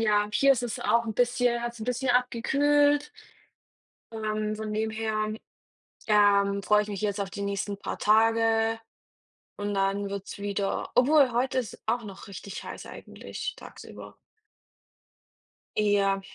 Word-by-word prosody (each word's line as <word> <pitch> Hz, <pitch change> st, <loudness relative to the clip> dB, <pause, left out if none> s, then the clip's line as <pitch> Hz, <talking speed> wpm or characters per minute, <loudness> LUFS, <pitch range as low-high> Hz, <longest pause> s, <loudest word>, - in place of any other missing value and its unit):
ja, 210 Hz, -2 st, +2 dB
hier 275 Hz, +4 st, +5 dB
ist 250 Hz, -, -2 dB
es 240 Hz, -3 st, -4 dB
auch 235 Hz, 0 st, +2 dB
'n 220 Hz, -, -3 dB
bisschen 245 Hz, -1 st, +1 dB
hat's 235 Hz, -1 st, -5 dB
'n -, -, -4 dB
bisschen 250 Hz, +2 st, -1 dB
abgekühlt. 290 Hz, +4 st, +2 dB, 1.0 s
Ähm, 215 Hz, -1 st, -2 dB
von 215 Hz, 0 st, -5 dB
dem 220 Hz, +1 st, -1 dB
her, 215 Hz, -1 st, -2 dB, 0.8 s
ähm, 200 Hz, -2 st, +4 dB
freue 210 Hz, +2 st, +3 dB
ich -, -, -10 dB
mich 200 Hz, -1 st, -5 dB
jetzt 205 Hz, -1 st, -1 dB
auf 200 Hz, -1 st, -2 dB
die 200 Hz, -, -6 dB
nächsten 200 Hz, 0 st, -3 dB
paar -, -, -5 dB
Tage 225 Hz, +1 st, +3 dB, 0.8 s
und 205 Hz, 0 st, -3 dB
dann 195 Hz, +1 st, 0 dB
wird's 200 Hz, 0 st, -6 dB
wieder 200 Hz, -1 st, -2 dB
obwohl, 270 Hz, 0 st, +5 dB
heute 255 Hz, +2 st, 0 dB
ist 235 Hz, -5 st, -4 dB
's -, -, -14 dB
auch 235 Hz, +2 st, 0 dB
noch 195 Hz, -2 st, -10 dB
richtig 200 Hz, 0 st, -8 dB
heiß -, -, -8 dB
eigentlich, 435 Hz, 0 st, -7 dB
tagsüber. -, -, -11 dB, 1.6 s
Ja, 200 Hz, -2 st, +2 dB
215 Hz, 145 wpm, -27 LUFS, 205-240 Hz, 1.6 s, hier